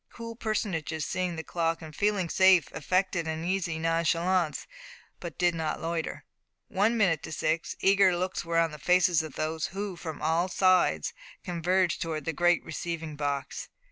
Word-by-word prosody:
Cool 230 -1 -8
personages, 185 -9 -2
seeing 180 -2 -2
the 160 - -5
clock, 165 -1 -1
and 155 -2 -10
feeling 205 -2 +1
safe, 190 -1 +4
affected 185 0 0
an 160 0 -3
easy 175 -2 -1
nonchalance, 165 +1 +1 0.5
but 170 -4 -7
did 175 -1 +3
not 160 -2 -2
loiter. 165 0 -3 0.4
One 215 +5 +2
minute 175 -8 +2
to - - -8
six 160 +2 -1
eager 195 -2 +4
looks 185 +1 -2
were 165 0 -1
on 165 -1 +3
the 150 - -9
faces 180 0 +4
of 155 -3 -8
those 155 0 -2
who, 195 0 -5
from 160 -3 -7
all 165 +3 +1
sides, 180 - +3 0.3
converged 180 +1 0
towards 155 -3 -3
the 165 - -1
great 175 +2 +3
receiving 160 -1 -5
box. 140 -1 -3
170 Hz, 165 wpm, -28 LUFS, 160-185 Hz, 0.5 s, safe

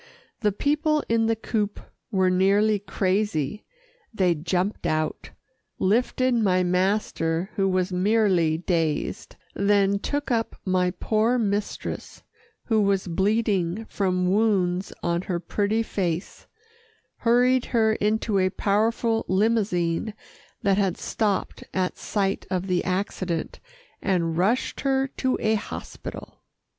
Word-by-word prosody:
The 210 -2 +2
people 300 - +1
in 225 -1 +2
the 225 - +2
coupé 215 -2 -2 0.3
were 190 -4 +2
nearly 200 +3 +3
crazy. 195 -3 -1 0.5
They 185 -6 +2
jumped 180 +5 -1
out, 155 0 -2 0.5
lifted 250 +5 +2
my 190 -6 +2
master 180 -1 0
who 195 -1 +2
was 185 0 0
merely 185 -4 +2
dazed, 165 -3 -2 0.2
then 200 0 +2
took 290 +4 -2
up 225 -1 0
my 185 -1 +2
poor 220 +6 +1
mistress 205 -3 -3 0.4
who 220 -2 +2
was 200 -1 +1
bleeding 195 +1 0
from 185 -3 0
wounds 195 -3 +1
on 170 0 0
her 175 -2 0
pretty 205 +5 0
face, 180 -5 -3 0.7
hurried 245 +2 +3
her 220 -2 +2
into 215 -1 0
a 185 0 +3
powerful 225 +3 +1
limousine 195 -2 +1 0.5
that 200 -2 +3
had 195 -3 +1
stopped 210 -3 -2
at 185 -1 0
sight 195 -2 -1
of 185 0 -1
the 180 -2 0
accident, 185 -2 -2 0.4
and 170 -4 0
rushed 200 +9 +1
her 270 -1 +1
to 260 -1 +1
a 220 0 +2
hospital. 215 - -6
200 Hz, 120 wpm, -25 LUFS, 180-220 Hz, 0.7 s, nearly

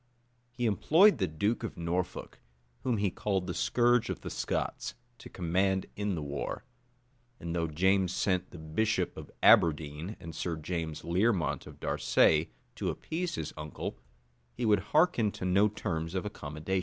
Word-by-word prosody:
He 120 0 -3
employed 160 - +5
the 95 - +2
duke 100 +9 -1
of 115 - -5
Norfolk, 90 +2 -3 0.4
whom 125 -3 0
he 100 -2 +1
called 95 +1 -1
the 90 - -3
scourge 120 +3 +2
of - - -4
the - - -6
Scots, - - -2 0.2
to - - -11
command 95 +2 0
in 100 -2 -1
the 80 - -4
war: 70 0 -4 0.8
and 85 0 -4
though 85 -1 0
James 95 +4 +2
sent 90 -1 0
the - - -11
bishop 80 +8 -1
of - - -9
Aberdeen, 80 +4 +4
and 85 -2 -8
Sir 85 +2 -2
James 80 -1 -4
Learmont 95 +1 +1
of - - -12
Darsay, 80 +1 +3 0.3
to - - -1
appease 175 +2 -3
his 80 -2 -4
uncle, 75 -3 -6 0.6
he 120 - -2
would 105 -2 +4
hearken 150 -9 +3
to - - -5
no 95 +3 +4
terms 85 -5 -3
of 95 - -1
accommodation. 80 -1 -3
90 Hz, 160 wpm, -30 LUFS, 80-105 Hz, 0.8 s, employed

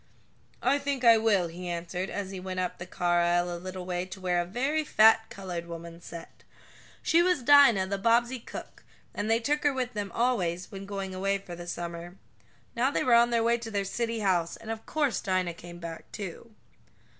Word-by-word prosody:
"I 275 +3 +3
think 280 -2 -2
I 230 -2 +7
will," 205 -5 +2
he 175 +2 -7
answered, 175 +2 -3
as 195 -2 -4
he 190 - -6
went 185 0 -4
up 180 -1 -3
the 175 - -7
car 175 -1 +1
aisle 175 0 +1
a - - -6
little 185 0 -6
way 180 -1 -2
to 190 - -9
where 180 -1 +1
a - - -3
very 270 - 0
fat 220 -4 +5
colored 180 -3 -6
woman 170 0 -8
sat. 170 0 -11 0.6
She 335 - +4
was 355 -6 +2
Dinah, 260 -8 +7
the 195 +1 -3
Bobbsey 235 +4 +2
cook, - - -10 0.3
and 205 +1 -3
they 225 +1 +4
took 295 +5 0
her 290 - +4
with 255 -2 -3
them 205 -2 -4
always 185 -8 0
when 195 -1 -8
going 195 -1 -4
away 195 +1 0
for 185 -3 -9
the 175 0 -9
summer. 175 0 -6 0.6
Now 245 +3 +2
they - - 0
were 250 - +3
on 235 0 +6
their 235 -1 +2
way 235 +1 +2
to 230 -1 -6
their 200 -2 -1
city 230 +2 -2
house, 175 -4 +1
and 225 - -7
of 225 0 -7
course 290 -9 0
Dinah 185 -2 0
came 175 +1 -11
back, 165 -1 -8
too. 200 +3 -7
195 Hz, 210 wpm, -28 LUFS, 175-235 Hz, 0.6 s, I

